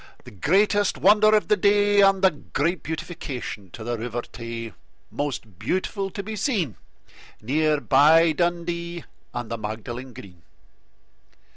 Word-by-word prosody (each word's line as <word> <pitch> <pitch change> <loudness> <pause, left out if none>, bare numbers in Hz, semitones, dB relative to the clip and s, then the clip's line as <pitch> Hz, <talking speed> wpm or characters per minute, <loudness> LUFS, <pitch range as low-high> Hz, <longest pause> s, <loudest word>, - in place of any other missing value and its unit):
The - - -12
greatest 200 - +2
wonder 215 +2 +5
of 210 -6 +1
the 210 - +4
day, 205 +1 +3
And 195 -1 +4
a 190 - +6
great 155 +3 -2
beautification 145 - -6
to 110 - -10
the 120 0 -3
River 120 +1 -4
Tay, 115 -1 -7 0.4
Most 115 -10 -5
beautiful 195 +1 -2
to 200 +1 -6
be 215 +2 -5
seen, 200 - -1 0.6
Near 150 +5 +1
by 160 +4 +5
Dundee 170 +1 -2 0.3
and 120 -1 -6
the 115 - -3
Magdalen 120 +4 -6
Green. 95 -8 -13
160 Hz, 135 wpm, -24 LUFS, 120-195 Hz, 0.6 s, a